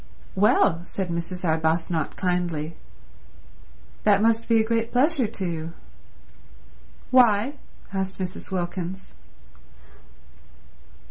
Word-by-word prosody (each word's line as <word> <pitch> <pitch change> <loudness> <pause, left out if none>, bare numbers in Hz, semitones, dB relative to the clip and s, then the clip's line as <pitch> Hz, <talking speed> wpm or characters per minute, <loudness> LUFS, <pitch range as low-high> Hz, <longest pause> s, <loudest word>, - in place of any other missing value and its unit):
"Well," 185 -3 +3
said 185 +1 -4
Mrs. 170 +2 -4
Arbuthnot 160 0 0
kindly, 175 -3 -1 1.3
"that 200 -1 +5
must 225 +2 +2
be 230 -1 +5
a - - +4
great 230 0 0
pleasure 270 0 +3
to 205 -3 -5
you." 165 -1 -4 1.4
"Why?" 245 0 +5 0.4
asked 190 0 -2
Mrs. 185 0 -5
Wilkins. 180 0 -4
185 Hz, 90 wpm, -25 LUFS, 170-220 Hz, 1.4 s, that